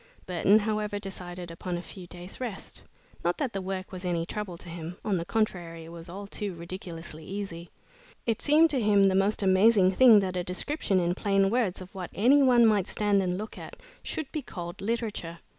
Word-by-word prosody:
Burton, 185 +3 +4
however, 210 -1 -1
decided 180 -3 -7
upon 175 +1 -4
a 175 - -6
few 180 +1 -10
days' 180 +6 -9
rest. 230 -6 -6 0.4
Not - - +1
that 270 -7 -2
the 195 - -2
work 190 0 -4
was 185 -1 -7
any 170 -2 -1
trouble 190 -2 -5
to 175 - -11
him; 170 +1 -7
on 205 -4 +1
the 170 - -3
contrary 175 -7 -2
it 165 - -11
was 170 0 -9
all 195 +3 -7
too 200 -1 -4
ridiculously 170 -2 -7
easy. 185 -3 -6 0.6
It 230 -3 0
seemed 310 +2 +5
to 265 -4 +1
him 205 -2 +4
the 195 -1 +4
most 195 +2 +2
amazing 190 0 +5
thing 225 +1 +7
that 185 -1 -2
a 180 - -1
description 190 - -1
in 175 0 +1
plain 195 0 +2
words 220 -7 0
of 185 +1 -11
what 185 -3 -6
any 260 +8 +5
one 245 -3 +6
might 210 -4 +3
stand 205 -2 +2
and 180 -1 -1
look 215 +2 -6
at, - - -9 0.3
should 315 -4 -4
be 305 - -3
called 175 -8 -7
literature. 210 -6 -3
195 Hz, 205 wpm, -28 LUFS, 175-215 Hz, 0.6 s, thing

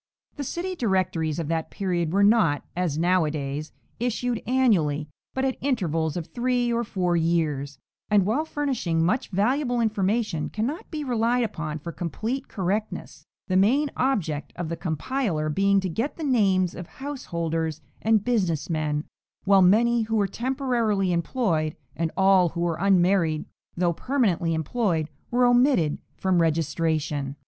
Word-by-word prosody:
The 285 - -4
city 350 +7 -3
directories 185 - 0
of 165 -3 -3
that 165 -1 -1
period 175 -4 -1
were 200 +3 +3
not, 200 -9 +3
as 175 -5 -1
now 180 +2 +3
a 155 - 0
days, 145 0 -4 0.3
issued 245 0 -1
annually, 180 - +2 0.3
but 265 0 0
at 265 - -1
intervals 170 - 0
of 170 - -3
three 245 +1 0
or 235 +1 +1
four 180 -5 0
years, 155 -5 0 0.3
and 205 -3 +4
while 235 +10 +1
furnishing 260 - -1
much 240 +9 0
valuable 245 +6 +1
information, 210 -5 0
cannot 240 +9 -3
be 305 -2 -4
relied 245 -1 +1
upon 160 -8 -3
for 170 +3 -7
complete 220 - -4
correctness, 205 +3 -3 0.2
the 185 - 0
main 265 +10 +3
object 180 - -1
of 175 -2 -4
the 170 - -2
compiler 165 - -2
being 195 +5 +3
to 190 - -2
get 225 - -3
the 325 - -5
names 195 - +2
of 180 - -8
house 275 -1 -6
holders 165 -1 -2 0.2
and 220 -2 +2
business 180 -11 0
men, 150 -2 -1 0.4
while 195 -1 +5
many 230 +6 +4
who 225 0 -1
were 205 -2 +3
temporarily 235 -6 0
employed, 170 -3 0 0.2
and 165 0 -1
all 190 -2 +5
who 170 +1 -5
were 170 -2 0
unmarried 180 -4 +3 0.3
though 175 -1 +2
permanently 185 - 0
employed, 160 - 0 0.2
were 245 +1 +3
omitted 245 - +3 0.2
from 185 -2 +2
registration. 155 -3 0
190 Hz, 155 wpm, -25 LUFS, 165-240 Hz, 0.4 s, while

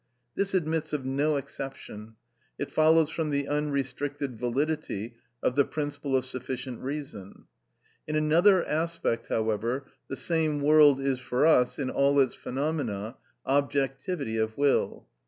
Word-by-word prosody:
This 195 -1 0
admits 160 -3 -1
of 140 -3 -2
no 145 +3 +1
exception: 130 -5 -7 0.4
it - - -4
follows 160 0 +4
from 160 -2 -2
the 140 -1 -1
unrestricted 145 -2 -2
validity 125 -2 -2 0.3
of 125 - +1
the 140 - +5
principle 145 -2 -3
of 130 -1 +1
sufficient 130 -1 -5
reason. 135 -9 -7 0.6
In 155 - -2
another 170 +5 +4
aspect, 160 -6 -1
however, 115 +4 -1 0.2
the - - -4
same 155 -1 +1
world 145 -1 +6
is 135 -2 0
for 130 +2 0
us, 125 -6 +4
in 135 -3 -2
all 140 +1 +3
its 130 -2 +3
phenomena, 130 -6 -3 0.3
objectivity 135 -1 -1
of 110 0 -1
will. 140 -1 +1
140 Hz, 135 wpm, -28 LUFS, 130-155 Hz, 0.6 s, world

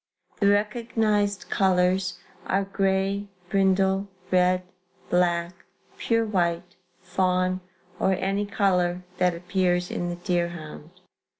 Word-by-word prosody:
The 200 - +3
recognized 210 -1 +1
colors 185 -1 +2 0.3
are 195 +1 +1
gray, 195 +1 0 0.2
brindle, 195 0 +2 0.2
red, 180 0 +3 0.5
black, 175 -1 +2 0.5
pure 230 -1 +1
white, 175 -4 -1 0.3
fawn 185 0 0 0.4
or 190 - +2
any 195 +2 -1
color 180 -3 +1 0.2
that 180 -1 +3
appears 180 0 0
in 175 - -2
the 175 - -3
deerhound." 170 -3 -3
185 Hz, 100 wpm, -25 LUFS, 180-200 Hz, 0.5 s, The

